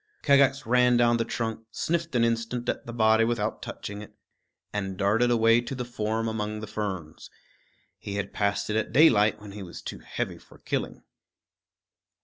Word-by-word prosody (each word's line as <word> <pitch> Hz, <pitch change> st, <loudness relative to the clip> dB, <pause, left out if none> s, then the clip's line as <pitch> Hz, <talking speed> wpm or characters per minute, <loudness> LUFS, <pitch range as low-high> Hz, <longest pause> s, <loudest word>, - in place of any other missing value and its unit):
Kagax 140 Hz, -1 st, +4 dB
ran 125 Hz, +1 st, +4 dB
down 120 Hz, -1 st, +4 dB
the 115 Hz, -, +1 dB
trunk, 110 Hz, -1 st, -4 dB
sniffed 170 Hz, +4 st, -2 dB
an 120 Hz, -, +3 dB
instant 115 Hz, +1 st, -1 dB
at -, -, -2 dB
the -, -, -5 dB
body 110 Hz, -1 st, +4 dB
without 115 Hz, -2 st, -1 dB
touching 105 Hz, 0 st, -7 dB
it, 105 Hz, -, -11 dB, 0.6 s
and 95 Hz, -2 st, -3 dB
darted 110 Hz, +6 st, +2 dB
away 115 Hz, 0 st, +4 dB
to 130 Hz, +3 st, -6 dB
the 125 Hz, -1 st, -4 dB
form 115 Hz, -1 st, -2 dB
among 105 Hz, -1 st, -3 dB
the 110 Hz, -, -5 dB
ferns. 95 Hz, -7 st, -5 dB, 0.7 s
He 100 Hz, -, -6 dB
had 100 Hz, -1 st, -3 dB
passed 100 Hz, 0 st, 0 dB
it -, -, -1 dB
at 110 Hz, -, -1 dB
daylight 105 Hz, -8 st, +5 dB
when 105 Hz, -1 st, -10 dB
he 105 Hz, +1 st, -8 dB
was 90 Hz, -3 st, -8 dB
too -, -, -7 dB
heavy -, -, -4 dB
for -, -, -18 dB
killing. -, -, -4 dB
110 Hz, 175 wpm, -27 LUFS, 105-120 Hz, 0.7 s, daylight